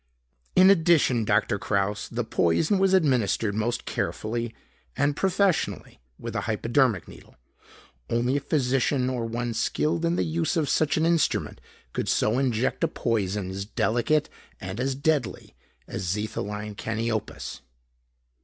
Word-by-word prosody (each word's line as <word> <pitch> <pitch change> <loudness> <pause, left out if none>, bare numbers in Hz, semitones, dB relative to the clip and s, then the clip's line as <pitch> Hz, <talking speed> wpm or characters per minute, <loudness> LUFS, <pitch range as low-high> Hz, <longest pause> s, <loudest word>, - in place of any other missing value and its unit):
In 185 +1 +8
addition, 160 - +3
Doctor 105 -1 +1
Kraus, 100 +1 -1
the 120 +1 -3
poison 115 - +2
was 190 0 +4
administered 125 - +2
most 115 +3 -1
carefully 115 +1 -2 0.5
and 140 0 +2
professionally 195 0 0 0.2
with - - -7
a - - 0
hypodermic 115 - +1
needle. - - -15 0.7
Only 120 +4 +1
a - - +1
physician, 130 -2 +1
or 120 -3 -2
one 120 +1 -3
skilled 150 +8 0
in 170 +1 +1
the - - +1
use 165 +1 -1
of 155 -3 0
such 155 0 +2
an 160 - +2
instrument 165 -2 +1 0.3
could - - -2
so 110 +4 +2
inject 130 +1 0
a - - +4
poison 105 - -1
as 95 +1 -4
delicate 120 +7 +1 0.3
and 95 +4 -6
as 130 +1 0
deadly 140 -3 -1 0.3
as - - -5
xetholine 105 +2 -3
caniopus. 115 +1 -3
120 Hz, 135 wpm, -26 LUFS, 110-155 Hz, 0.7 s, In